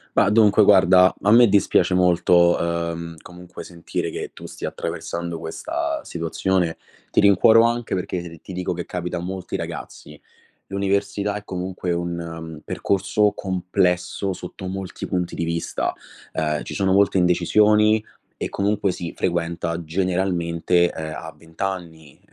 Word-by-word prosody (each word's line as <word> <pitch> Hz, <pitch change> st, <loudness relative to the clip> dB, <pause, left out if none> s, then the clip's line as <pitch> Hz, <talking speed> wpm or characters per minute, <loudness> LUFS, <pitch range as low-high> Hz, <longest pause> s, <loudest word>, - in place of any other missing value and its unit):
Ma 100 Hz, -, +4 dB
dunque, 105 Hz, -1 st, +5 dB
guarda 95 Hz, -2 st, +6 dB
a 105 Hz, -, +4 dB
me 120 Hz, +1 st, +8 dB
dispiace 95 Hz, -2 st, +3 dB
molto, 85 Hz, -1 st, +4 dB
uhm, 85 Hz, 0 st, -3 dB
comunque 90 Hz, 0 st, -11 dB
sentire 85 Hz, -2 st, -5 dB
che -, -, -5 dB
tu -, -, -12 dB
stia -, -, -5 dB
attraversando 85 Hz, -1 st, -5 dB
questa 80 Hz, 0 st, -3 dB
situazione. 85 Hz, +1 st, -1 dB, 0.3 s
Ti -, -, +1 dB
rincuoro 105 Hz, +3 st, +6 dB
anche 120 Hz, -1 st, 0 dB
perché 85 Hz, -3 st, -5 dB
ti 95 Hz, -, -9 dB
dico 90 Hz, 0 st, -2 dB
che 85 Hz, 0 st, -5 dB
capita 90 Hz, -1 st, -4 dB
a -, -, -3 dB
molti 95 Hz, +1 st, -5 dB
ragazzi. 75 Hz, 0 st, -7 dB, 0.5 s
L'università 100 Hz, +1 st, -1 dB
è 105 Hz, -, -6 dB
comunque 90 Hz, -2 st, -3 dB
un, 85 Hz, 0 st, -2 dB
mhmm, 80 Hz, -2 st, -7 dB
percorso 100 Hz, +2 st, +1 dB
complesso 90 Hz, 0 st, -1 dB
sotto 90 Hz, +1 st, -8 dB
molti 95 Hz, 0 st, -5 dB
punti 90 Hz, -1 st, -2 dB
di 85 Hz, -, -2 dB
vista, 85 Hz, 0 st, -2 dB, 0.4 s
ehm, 75 Hz, -1 st, -1 dB
ci -, -, -7 dB
sono 95 Hz, -1 st, +1 dB
molte 100 Hz, -1 st, +3 dB
indecisioni 105 Hz, +5 st, +4 dB, 0.3 s
e -, -, -3 dB
comunque 100 Hz, -1 st, 0 dB
si 85 Hz, -1 st, -6 dB
frequenta 85 Hz, -1 st, -2 dB
generalmente, 90 Hz, 0 st, +1 dB
ehm, 80 Hz, -1 st, -6 dB
a 80 Hz, -, -8 dB
20 80 Hz, +2 st, -13 dB
anni, 85 Hz, -6 st, -5 dB
90 Hz, 140 wpm, -22 LUFS, 85-100 Hz, 0.5 s, me